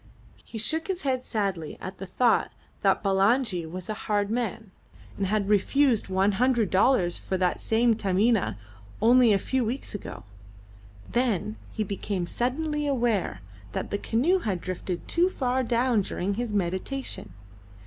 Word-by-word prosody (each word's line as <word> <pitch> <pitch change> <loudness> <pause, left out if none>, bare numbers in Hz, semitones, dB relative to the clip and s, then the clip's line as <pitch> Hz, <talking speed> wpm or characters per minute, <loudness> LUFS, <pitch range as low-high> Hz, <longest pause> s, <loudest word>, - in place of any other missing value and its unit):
He 230 - -8
shook 320 - 0
his 380 -2 -2
head 260 -2 0
sadly 195 -10 -2
at 185 +1 -7
the 195 - -6
thought 235 +5 +2 0.3
that - - +2
Bulangi 195 -2 +2
was 180 +2 -6
a 215 - -2 0.2
hard 205 0 +1
man, 225 -3 -3 0.4
and 195 - -1
had 205 0 0
refused 230 +4 +3
one 190 +2 +2
hundred 235 -1 +2
dollars 190 -3 +3
for 190 - -2
that 180 -1 +1
same 230 +1 +3
Taminah 210 - +1 0.4
only 240 +1 +6
a 200 - +5
few 260 +6 -1
weeks 240 +3 -4
ago; 205 - -7 0.9
then 220 -4 0 0.2
he 215 - -2
became 195 -2 -3
suddenly 295 - -1
aware 230 - 0 0.3
that - - -3
the 205 - -1
canoe 290 - +2
had 200 - -2
drifted 180 0 -5
too 350 +2 +3
far 260 -6 0
down 240 -1 +2
during 195 +1 -2
his 235 +2 -3
meditation. 190 - -3
215 Hz, 150 wpm, -27 LUFS, 190-250 Hz, 0.9 s, only